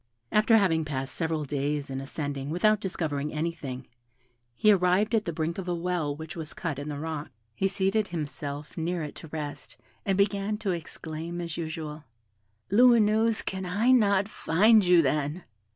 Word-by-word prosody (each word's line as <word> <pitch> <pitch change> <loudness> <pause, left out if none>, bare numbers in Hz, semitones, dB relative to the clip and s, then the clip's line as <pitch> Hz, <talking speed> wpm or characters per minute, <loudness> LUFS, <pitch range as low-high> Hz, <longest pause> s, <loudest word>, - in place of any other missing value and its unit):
After 220 +2 +5
having 165 -6 +2
passed 135 -3 -3
several 160 -2 -1
days 145 0 -2
in 135 0 -3
ascending 140 0 -4
without 210 +6 +3
discovering 150 -7 -2
anything, 150 -5 -4 0.7
he 215 - +5
arrived 190 +3 +3
at 220 -2 +2
the 170 - -1
brink 165 +2 -2
of 185 - -5
a 175 - 0
well 170 -4 -1
which 160 +1 -8
was 160 -2 -7
cut 160 -6 -3
in 145 +1 -5
the 145 - -4
rock. 155 0 -4 0.2
He 195 - +1
seated 200 +2 +1
himself 150 -3 -5
near 170 +1 -2
it 150 - -6
to 160 - -10
rest, 145 -1 -6 0.3
and 195 -1 0
began 200 +1 +1
to 205 -3 -2
exclaim, 165 0 -5
as 170 -2 -4
usual, 155 -2 -5 0.7
"Lumineuse, 225 -1 +4
can 190 0 -3
I 205 +7 +2
not 200 -5 +4
find 215 +3 +4
you, 175 -2 +5
then?" 150 +4 -1
165 Hz, 170 wpm, -28 LUFS, 150-195 Hz, 0.7 s, After